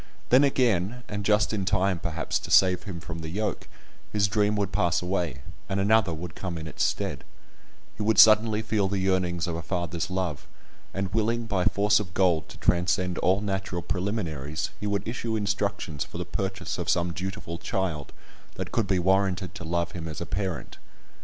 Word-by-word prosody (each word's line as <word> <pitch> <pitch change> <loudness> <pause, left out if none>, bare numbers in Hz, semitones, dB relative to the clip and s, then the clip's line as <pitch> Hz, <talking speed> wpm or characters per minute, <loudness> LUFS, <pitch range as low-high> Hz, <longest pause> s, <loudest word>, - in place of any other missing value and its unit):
Then 130 +3 +7
again 120 -4 +1
(and 105 -1 -4
just 105 +1 +3
in 100 -3 0
time 95 -1 +1
perhaps 85 -2 -2
to - - -8
save 90 0 +5
him 95 -5 -5
from 80 0 -6
the 80 -1 -5
yoke) 105 +5 -2 0.4
his 100 -2 +2
dream 105 +1 +2
would 100 -2 -1
pass 90 -5 +2
away, 90 -7 -2 0.3
and 95 0 0
another 100 -1 +4
would 80 +1 -6
come 90 -3 -5
in 80 - -6
its 80 - -2
stead; - - -1 0.7
he - - -6
would 110 0 +2
suddenly 110 +1 +7
feel 105 -2 +1
the 100 +1 -1
yearnings 90 -3 +1
of 85 -2 -3
a 85 - -3
father's 85 -1 -2
love, 90 -6 -2 0.4
and 95 0 -3
willing 115 +2 +1
by 100 -5 0
force 105 +1 +4
of 90 -5 -6
gold 90 -5 +2
to - - -11
transcend 90 0 +1
all 95 +2 +2
natural 95 -3 -2
preliminaries, 80 -7 -2
he 105 - -3
would 100 0 -1
issue 115 -1 -2
instructions 100 -6 -1
for - - -9
the 90 - -3
purchase 95 +1 -3
of - - -2
some 85 0 +1
dutiful 90 -2 -5
child 85 -7 -2 0.4
that - - -5
could 115 -4 0
be 95 -1 +2
warranted 95 +1 +1
to - - -7
love 85 +1 -1
him 85 -4 -6
as 80 -3 -6
a - - -3
parent. 95 -3 -4
95 Hz, 190 wpm, -27 LUFS, 85-105 Hz, 0.7 s, Then